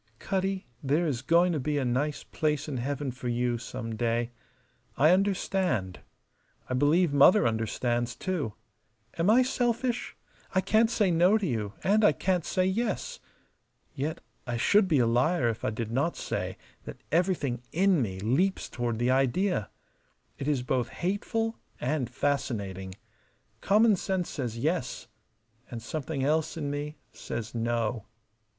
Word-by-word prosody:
"Cutty, 190 +3 -2 0.2
there 150 +5 +1
is 135 -7 -1
going 170 +5 +4
to 155 - 0
be 150 +2 -1
a 135 - 0
nice 140 +5 -1
place 150 -1 -1
in 140 -4 -3
heaven 140 +2 -2
for 125 0 -7
you 120 0 0
some 115 -1 -5
day. 115 +1 0 0.7
I 155 +4 +6
understand. 185 - +1 0.7
I - - -3
believe 145 +5 +3
Mother 145 - +6
understands, 120 +2 -1
too. 155 - -2 0.7
Am 170 +4 +3
I 245 +4 +6
selfish? 245 -1 -1 0.4
I - - +5
can't 220 +3 +3
say 210 -5 +2
No 175 +5 +5
to 210 - -2
you 110 - -2
and 210 +3 +3
I 210 - +6
can't 185 -3 0
say 185 +4 0
Yes. 210 +3 -1 0.7
Yet 150 +4 -3 0.3
I 120 -1 -1
should 200 - +4
be 160 -5 +3
a 125 - +4
liar 125 +3 +2
if 110 - -4
I - - +1
did 110 0 -4
not 140 +8 0
say - - -3 0.3
that - - -9
everything 160 -8 +1
in 185 -2 +3
me 95 -5 -3
leaps 155 - +1
toward 120 -2 -2
the 120 +2 +2
idea. 135 - +1 0.7
It 140 - -4
is 140 -4 +1
both 125 -1 0
hateful 225 +5 -2 0.2
and 130 -1 -1
fascinating. 100 -10 -2 0.7
Common 215 +2 +5
sense 185 -1 -2
says 120 -6 -4
Yes; 150 +1 -2 0.6
and 120 - -5
something 140 +3 -4
else 155 +3 +1
in 145 -3 -2
me 145 +1 -4
says 115 -1 -6
No. 115 -1 -1
145 Hz, 150 wpm, -28 LUFS, 120-185 Hz, 0.7 s, I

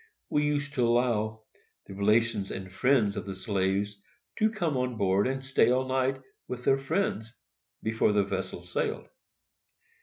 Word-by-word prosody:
We 150 - +2
used 145 -1 -1
to 125 - +1
allow 110 -3 +1 0.4
the - - -9
relations 105 0 +2
and 95 -1 -6
friends 110 -1 +3
of - - -5
the 95 - -4
slaves 100 +1 -1 0.4
to 215 - +4
come 175 -9 -1
on 125 -2 -1
board 100 +1 +2
and 135 0 -3
stay 130 -3 +3
all 130 +1 +2
night 130 0 0 0.3
with 125 0 -6
their 135 0 +4
friends, 135 - -1 0.5
before 110 -1 +2
the 105 -1 +3
vessel 95 -2 -4
sailed. 90 - -2
115 Hz, 155 wpm, -28 LUFS, 100-130 Hz, 0.5 s, to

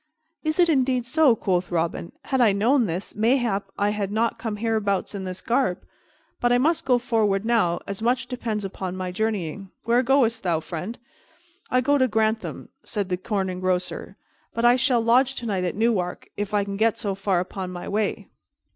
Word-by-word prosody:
"Is 310 -1 0
it 350 -1 +5
indeed 260 -5 +2
so?" 275 -1 +4
quoth 185 -4 0
Robin. 170 0 -2
"Had 265 -2 +1
I 220 -4 +5
known 235 +4 +3
this, 175 +3 -4
mayhap 225 -2 +1
I 205 0 +2
had 205 -2 -2
not 225 +2 0
come 225 -3 -3
hereabouts 210 -3 -1
in 195 -2 -5
this 185 0 -5
garb. 240 -7 0 0.6
But 240 - +2
I 245 - +5
must 310 +6 +1
go 255 -2 +4
forward 220 -5 +1
now, 220 -8 +2
as 200 +1 -5
much 245 +2 +1
depends 230 -5 -3
upon 190 -1 -5
my 185 -1 -3
journeying. 195 -2 -2
Where 235 +2 +3
goest 245 -3 +2
thou, 170 -3 +1
friend?" 180 +8 -6 0.7
"I 255 - +3
go 285 +3 +2
to 260 - +4
Grantham," 220 0 -1
said 205 -4 -3
the 180 - 0
Corn 195 0 -2
Engrosser, 185 0 -2 0.4
"but 230 - +1
I 240 +1 +7
shall 250 -1 +2
lodge 250 +3 +3
tonight 200 -7 -2
at 175 - -2
Newark, 205 -5 0
if 205 -1 -3
I 205 -1 +2
can 200 0 -5
get 225 +1 +2
so 205 -4 -2
far 195 -2 0
upon 185 +1 -4
my 175 -1 -7
way." 210 0 -1
215 Hz, 190 wpm, -24 LUFS, 190-245 Hz, 0.7 s, I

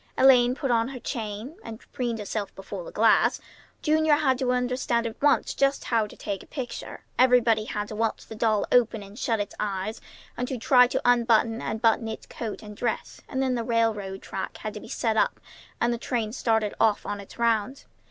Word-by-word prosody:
Elaine 250 -2 +6
put 270 -2 -2
on 230 -1 +2
her 265 -1 -7
chain, 230 - -5
and 225 -1 -8
preened 240 -3 -2
herself 210 -1 -4
before 195 - -7
the - - -9
glass; - - +4 0.4
Junior 310 -1 +4
had 265 -4 +1
to 255 -2 +1
understand 250 -1 0
at 230 0 -6
once 290 0 +3
just 275 0 +1
how 225 -3 +1
to - - -14
take 200 -3 -4
a - - -15
picture; 260 -4 -6 0.2
everybody 245 -4 +4
had 210 -1 -3
to 215 - -6
watch 225 +1 -1
the - - -9
doll 215 -1 +1
open 230 -3 +3
and 200 +4 -12
shut 230 -5 0
its 205 - -3
eyes, 205 +1 -3 0.3
and 250 - -2
to 260 - -3
try 250 +2 +5
to - - -1
unbutton 235 -1 +3
and 220 +1 -4
button 225 0 +3
its 220 - -6
coat 225 -2 -6
and 210 -1 -9
dress; 230 +2 -3
and 265 0 -1
then 260 -1 +1
the 235 -2 -1
railroad 220 -5 0
track - - -5
had - - -5
to - - -6
be - - -12
set - - 0
up - - +2 0.4
and 240 0 +2
the 235 - -4
train 230 -3 -2
started 220 -4 +1
off 215 -2 +2
on 205 0 -3
its 200 - -14
rounds. 235 +2 0
230 Hz, 210 wpm, -26 LUFS, 215-250 Hz, 0.4 s, Elaine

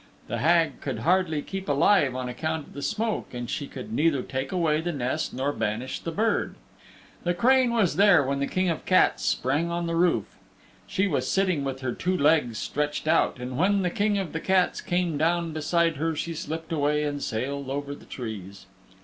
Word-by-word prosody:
The - - -3
Hag 165 -2 +2
could 130 -5 -3
hardly 165 0 +2
keep 195 -3 -6
alive 145 -1 +3
on 130 -1 -3
account 155 +5 -3
of - - -17
the 140 - -7
smoke 215 - -2
and 120 0 -4
she 140 +4 -3
could 125 -4 -8
neither 145 -1 +2
take 130 0 -4
away 160 -4 +1
the 175 +1 -2
nest 130 -5 -2
nor 135 +3 -1
banish 115 +4 -2
the 165 - -5
bird. 220 +7 0 0.7
The 175 0 0
crane 255 +5 +4
was 215 -8 +1
there 200 -7 +6
when 140 +1 -1
the 140 - 0
King 185 0 0
of 165 - -1
the - - -23
Cats 185 - +4
sprang 145 +7 0
on 170 0 -2
the 170 - -2
roof. 165 - +1 0.5
She 190 - +1
was 170 -8 -1
sitting 185 -7 +1
with 135 -1 -4
her 125 -2 -2
two 185 +1 -1
legs 145 -7 +3
stretched 150 +9 -2
out, 160 -4 +3
and 125 +1 -5
when 195 +2 +3
the 180 - 0
King 205 +1 +1
of 190 -5 -3
the 160 - -2
Cats 185 +1 +1
came 175 -4 -1
down 170 0 +1
beside 165 +1 +1
her 160 +2 -1
she 165 +2 -3
slipped 160 0 -5
away 150 -1 +1
and 145 -1 -2
sailed 135 +4 -3
over 140 +1 -3
the - - -13
trees. 100 -5 -7
155 Hz, 205 wpm, -26 LUFS, 140-175 Hz, 0.7 s, there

